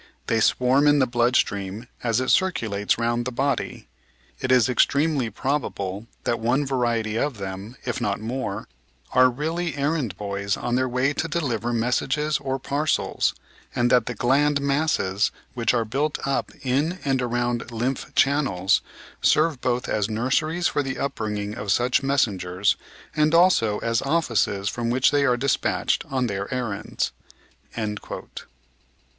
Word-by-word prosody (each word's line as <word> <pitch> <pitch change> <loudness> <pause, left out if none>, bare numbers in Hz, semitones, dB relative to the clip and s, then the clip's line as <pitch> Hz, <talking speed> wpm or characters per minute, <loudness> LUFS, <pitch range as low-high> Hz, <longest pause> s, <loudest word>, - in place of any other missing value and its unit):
They 115 - +1
swarm 130 +5 +3
in 145 0 +5
the 135 - +4
blood 120 0 +1
stream 100 +2 0 0.2
as 115 -1 +1
it 130 - +1
circulates 110 - +1
round 120 +1 0
the 130 - -3
body... 135 +1 -2 0.5
it 130 - -1
is 125 -3 +5
extremely 140 0 +2
probable 110 -7 -3 0.2
that 120 -1 0
one 125 +6 +1
variety 120 -5 0
of 140 -1 -1
them, 95 +4 -6
if 125 - -2
not 100 -1 -1
more, 110 -2 -4 0.4
are 130 0 +6
really 160 +6 -2
errand 140 - -1
boys 100 -1 -2
on 120 - -3
their 130 +1 +1
way 130 +3 +1
to 165 - -2
deliver 120 -9 -1
messages 135 +6 0
or 135 -1 -2
parcels, 145 +3 0 0.4
and 120 0 +2
that 125 - +4
the 120 - -3
gland 140 +5 +2
masses 140 -8 +1 0.2
which 115 -3 +1
are 120 -2 +1
built 145 +7 -1
up 135 0 -1
in 145 +7 0
and 135 -2 +1
around 120 -1 -1
lymph 125 +4 -2
channels 120 -10 +2 0.4
serve 155 -4 +3
both 125 0 0
as 105 0 0
nurseries 155 +10 0
for 145 - +2
the 135 -2 -4
upbringing 105 -6 -3
of 100 -1 -3
such 125 +6 +2
messengers, 100 -9 +1 0.4
and 155 +1 +3
also 165 - +4
as 115 0 +1
offices 120 -10 0
from 115 +1 -2
which 130 +2 +3
they 145 -1 +3
are 125 -2 +3
dispatched 135 +2 0
on 130 -2 0
their 100 -1 -3
errands." 120 -6 -2
125 Hz, 150 wpm, -24 LUFS, 110-140 Hz, 0.5 s, are